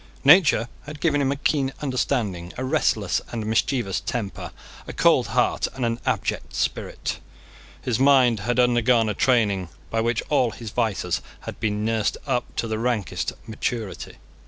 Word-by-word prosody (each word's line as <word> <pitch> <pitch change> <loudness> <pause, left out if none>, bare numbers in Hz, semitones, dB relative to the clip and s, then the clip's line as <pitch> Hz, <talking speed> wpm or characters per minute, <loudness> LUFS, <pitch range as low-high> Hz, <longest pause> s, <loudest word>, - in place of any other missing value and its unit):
Nature 145 - +6 0.2
had 150 +1 -8
given 145 -3 +2
him 135 -1 +1
a - - 0
keen 140 -1 0
understanding, 115 -10 -1
a 130 - -3
restless 115 - +1
and 115 -3 -3
mischievous 110 -1 0
temper, 110 -5 -4 0.4
a - - -6
cold - - +3
heart, - - +1
and 130 -2 -1
an 115 0 -1
abject - - -2
spirit. - - -2 0.6
His 120 -2 0
mind 130 -5 +5
had 120 +4 -1
undergone 120 -2 +3
a - - 0
training 100 -7 +2 0.2
by 115 - +1
which 115 0 0
all 135 -5 +3
his 115 -1 -8
vices 100 -8 -1 0.2
had - - -8
been 105 -1 -1
nursed 110 -2 0
up 125 -4 -2
to 115 - -1
the 110 -1 -2
rankest 105 -7 -1
maturity. 110 -1 -4
120 Hz, 160 wpm, -24 LUFS, 110-130 Hz, 0.6 s, Nature